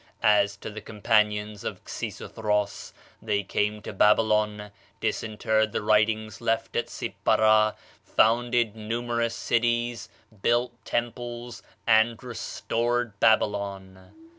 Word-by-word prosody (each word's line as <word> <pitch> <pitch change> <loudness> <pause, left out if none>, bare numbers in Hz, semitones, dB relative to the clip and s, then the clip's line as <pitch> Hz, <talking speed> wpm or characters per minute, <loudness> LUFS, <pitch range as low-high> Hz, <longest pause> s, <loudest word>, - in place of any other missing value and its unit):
As 100 -1 +4
to 105 - -7
the 110 +1 -8
companions 105 -1 0
of - - -5
Xisuthros, 105 -2 -3 0.3
they 105 -2 0
came 105 +2 -1
to - - -6
Babylon, 105 0 +2 0.3
disinterred 110 0 0
the - - -2
writings 110 0 +1
left 115 0 -1
at 120 - -1
Sippara, 110 0 +2 0.3
founded 120 -1 +2
numerous 115 +1 -2
cities, 120 -1 0 0.3
built 120 +2 +2
temples, 120 -1 -4 0.2
and 110 +1 +3
restored 120 -2 -2
Babylon." 100 -4 0
110 Hz, 100 wpm, -26 LUFS, 105-115 Hz, 0.3 s, As